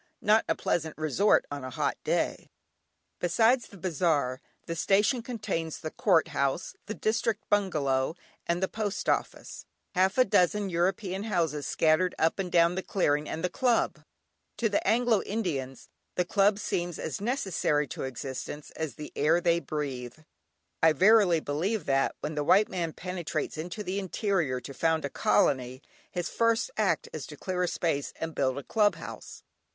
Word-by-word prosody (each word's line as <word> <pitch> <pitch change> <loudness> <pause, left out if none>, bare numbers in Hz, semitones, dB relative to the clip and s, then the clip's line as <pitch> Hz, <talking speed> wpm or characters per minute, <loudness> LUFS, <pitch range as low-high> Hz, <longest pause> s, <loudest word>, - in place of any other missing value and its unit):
Not 215 +2 +4
a - - +2
pleasant 160 -2 -1
resort 155 +7 +3
on 145 -2 -5
a 130 - -5
hot - - -1
day. - - -1 0.7
Besides 225 +8 +3
the 200 - -14
bazaar, 160 -7 0 0.2
the 165 - -4
station 205 +8 +2
contains 210 -9 -3
the 155 - -6
Court 175 -7 +3
House, 140 +5 -1
the 215 - -4
District 220 -1 -1
Bungalow, 155 -8 +1 0.3
and 170 +2 0
the - - +3
Post 210 -1 -3
Office; - - -2 0.3
half 190 +3 +2
a 255 - +6
dozen 195 +1 +2
European 190 +3 -1
houses 165 -8 -1
scattered 165 +3 +2
up 160 +4 +1
and 185 -2 -2
down 170 0 +4
the 190 - -2
clearing, 150 -7 0
and 165 - -4
the - - +3
club. 245 0 +1 0.6
To 225 - +1
the 205 - +1
Anglo 230 0 +3
Indians 145 - -3 0.3
the 180 - +1
club 200 +2 +3
seems 175 -4 -2
as 160 - -4
necessary 190 - 0
to - - -6
existence 130 +3 -6
as 155 -7 -5
the 150 - -9
air 160 +4 +3
they 170 -1 +2
breathe. 140 -7 -4 0.6
I 160 -1 +6
verily 190 -1 +5
believe 170 +7 -1
that 135 -1 +1
when 150 - -3
the 150 -1 -1
white 200 +8 +4
man 170 -3 -2
penetrates 175 -4 -4
into 175 +7 -5
the 190 +1 -2
interior 185 - -1
to 140 - -8
found 160 +1 +1
a 140 - -4
colony, 130 0 +1 0.3
his 175 -1 -3
first 230 - +1
act - - +1
is - - -5
to - - -10
clear 185 -2 -3
a 180 - +2
space 160 -5 -1
and 165 0 -4
build 130 -2 0
a 140 - -5
club 210 - +2
house. - - -9
175 Hz, 165 wpm, -28 LUFS, 150-200 Hz, 0.7 s, a